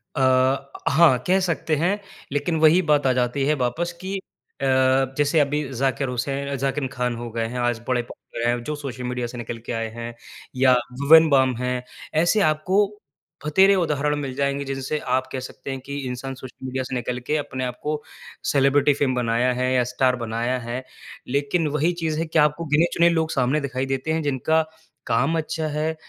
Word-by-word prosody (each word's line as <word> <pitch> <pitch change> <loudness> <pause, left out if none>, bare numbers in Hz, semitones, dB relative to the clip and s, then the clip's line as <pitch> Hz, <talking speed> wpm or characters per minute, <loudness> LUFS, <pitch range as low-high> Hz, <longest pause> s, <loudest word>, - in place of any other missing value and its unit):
अ, 130 +1 +2 0.2
हाँ। 145 -3 +5
कह 190 +1 +4
सकते 165 -3 0
हैं। 180 +7 +1 0.3
लेकिन 145 +4 0
वही 160 +4 +6
बात 150 -4 +2
आ - - +4
जाती 125 +2 0
है 150 - +3
वापस 170 +8 -2
कि 195 +1 -3 0.4
अ, - - 0 0.5
जैसे 145 +2 +3
अभी 145 +1 +1 0.2
ज़ाकिर 135 0 0
हुसैन 140 +3 -2
ज़ाकिर 135 +1 -1
खान 125 -1 -1
हो 120 0 -6
गए 115 0 -2
हैं, 125 +1 -5
आज 120 -2 0
बड़े 125 -1 +1
पोपुलर 120 0 -6
हैं 120 0 0
जो 150 +3 -3
सोशल 135 -3 -6
मीडिया 125 -1 -2
से 125 - -9
निकल 120 0 -5
के - - -4
आए 115 -1 -2
हैं। 120 0 -5 0.4
या 130 0 +5 0.3
भुवन 160 +3 +7
बाम 130 -3 +3
हैं। 125 0 -2 0.4
ऐसे 190 +5 +3
आपको 185 +6 +3 0.6
भतेरे 190 +6 +5
उदाहरण 150 -4 +1
मिल 135 -3 -4
जाएँगे 140 0 -1
जिनसे 135 +2 -3 0.2
आप 130 0 -3
कह 130 - -3
सकते 130 +1 -7
हैं 135 - -4
कि 140 0 -5
इंसान 130 +2 -5
सोशल 130 0 -11
मीडिया 130 0 -2
से 130 +1 -5
निकल 125 +1 -2
के 155 - +1
अपने 130 -3 -4
आपको 150 +5 -3 0.5
सेलिब्रिटी 140 +1 +4
फ़ेम 135 -3 0
बनाया 120 +1 +1
है 125 +1 0
या 125 -1 +3
स्टार 130 0 +2
बनाया 120 +3 -1
है। 120 +2 -5 0.4
लेकिन 145 +5 0
वही 165 +4 +2
चीज़ 160 -1 -1
है 165 - 0
कि 160 0 +1
आपको 150 +3 +2
गिने-चुने 170 +2 +4
लोग 160 -1 0
सामने 135 +3 +1
दिखाई 130 -1 -2
देते 135 +3 -2
हैं 160 - 0
जिनका 145 +3 +1 0.5
काम 135 +8 +2
अच्छा 160 0 -2
है, 155 +1 -1
135 Hz, 190 wpm, -23 LUFS, 125-155 Hz, 0.6 s, भुवन